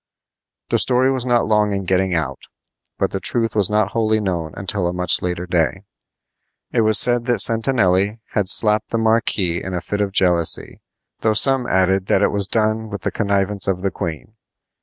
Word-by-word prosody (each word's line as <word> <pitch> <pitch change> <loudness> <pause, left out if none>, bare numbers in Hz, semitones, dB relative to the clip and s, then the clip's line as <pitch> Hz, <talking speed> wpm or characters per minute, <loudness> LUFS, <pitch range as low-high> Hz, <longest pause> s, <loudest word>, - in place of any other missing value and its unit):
The - - +1
story 130 +1 +3
was 130 -2 -3
not 120 -1 +2
long 105 -1 +1
in 100 -1 -3
getting 95 0 0
out, 70 -5 -4 0.5
but - - -1
the - - -3
truth 115 -2 -1
was 100 -4 +3
not 105 -2 0
wholly 110 -1 0
known 85 -6 -3
until 95 -1 -1
a 90 - -3
much 90 -1 +1
later 90 0 -3
day. 85 -3 -1 0.9
It - - +1
was 110 -1 +4
said 120 -1 +3
that 120 -1 0
Sentanelli 110 -3 +2
had 100 -3 -1
slapped 105 0 +3
the 115 - -2
marquis 110 -6 0
in 95 -1 -5
a - - -2
fit 105 +3 -4
of 100 -1 -1
jealousy, 90 -4 +1 0.4
though 110 - +1
some 135 +2 +2
added 95 +1 +1
that 95 - +2
it - - +2
was 100 -1 -2
done 110 0 -1
with 100 -3 -7
the - - -1
connivance 100 -1 0
of 95 -1 -2
the 100 - -1
queen. 85 +2 -6
100 Hz, 190 wpm, -19 LUFS, 90-110 Hz, 0.9 s, was